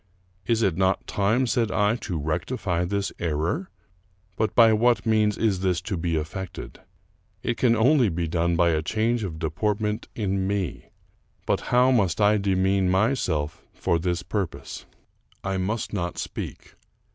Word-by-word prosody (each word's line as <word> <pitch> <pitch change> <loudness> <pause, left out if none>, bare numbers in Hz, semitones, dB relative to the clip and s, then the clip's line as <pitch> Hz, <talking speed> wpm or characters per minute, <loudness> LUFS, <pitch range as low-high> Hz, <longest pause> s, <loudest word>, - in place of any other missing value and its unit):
Is 115 -1 +2
it 90 -5 +1
not 95 0 +1
time, 110 +5 +1
said 115 -1 +1
I, 105 +1 +2
to 95 -7 -4
rectify 90 - -1
this 100 +2 -2
error? 85 - -1 0.7
But 110 - -1
by 115 -2 +7
what 115 -1 +2
means 110 -2 +2
is 105 -5 +1
this 90 -2 +1
to 100 +2 -3
be 85 -1 -1
effected? 85 +4 -5 0.6
It - - 0
can 120 -2 +3
only 125 +1 +4
be 85 -1 -2
done 85 +1 +1
by 85 0 +3
a 80 -1 +1
change 110 +7 0
of 85 -5 -4
deportment 105 +7 -1
in 95 -3 -1
me; 100 -7 -3 0.6
but - - +1
how 125 +1 +4
must 100 -9 +2
I 105 0 +4
demean 95 -1 +2
myself 85 - 0
for 85 - 0
this 90 +1 -1
purpose? 100 -6 -4 0.6
I 95 0 -1
must 105 +5 -2
not 90 -3 -3
speak. - - -6
100 Hz, 155 wpm, -25 LUFS, 85-110 Hz, 0.7 s, by